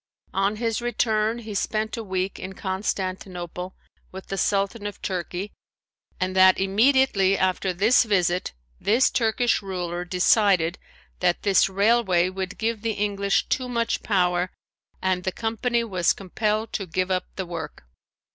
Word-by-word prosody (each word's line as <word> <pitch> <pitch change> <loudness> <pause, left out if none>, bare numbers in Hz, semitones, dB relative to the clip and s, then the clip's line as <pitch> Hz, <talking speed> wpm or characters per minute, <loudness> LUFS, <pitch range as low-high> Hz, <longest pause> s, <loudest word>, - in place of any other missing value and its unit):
On 195 +2 +1
his 230 +1 -1
return 225 -2 0
he 220 -3 -7
spent 215 +2 -1
a 230 - -5
week 190 -1 -3
in 190 - -6
Constantinople 185 -2 -4 0.4
with 190 0 -9
the 195 - -2
Sultan 200 +2 0
of 205 - -8
Turkey 185 +2 -3 0.7
and 185 0 -1
that 185 0 +6
immediately 195 -1 +3
after 185 0 0
this 205 +7 +4
visit 180 -5 +1 0.3
this 235 +5 +3
Turkish 240 -1 +1
ruler 180 -3 -4
decided 180 -1 +3 0.4
that 175 -1 +1
this 195 -1 +4
railway 195 -3 +3
would 190 0 -5
give 225 -1 -1
the 225 0 -1
English 200 -1 0
too 255 -1 -1
much 235 -1 -1
power 180 -3 +1 0.5
and 185 -1 +1
the 190 - -1
company 235 +3 -1
was 185 -6 +1
compelled 215 +3 -2
to 195 - -3
give 185 +3 -1
up 185 -1 0
the 190 - -3
work. 165 - -7
195 Hz, 145 wpm, -24 LUFS, 185-220 Hz, 0.7 s, that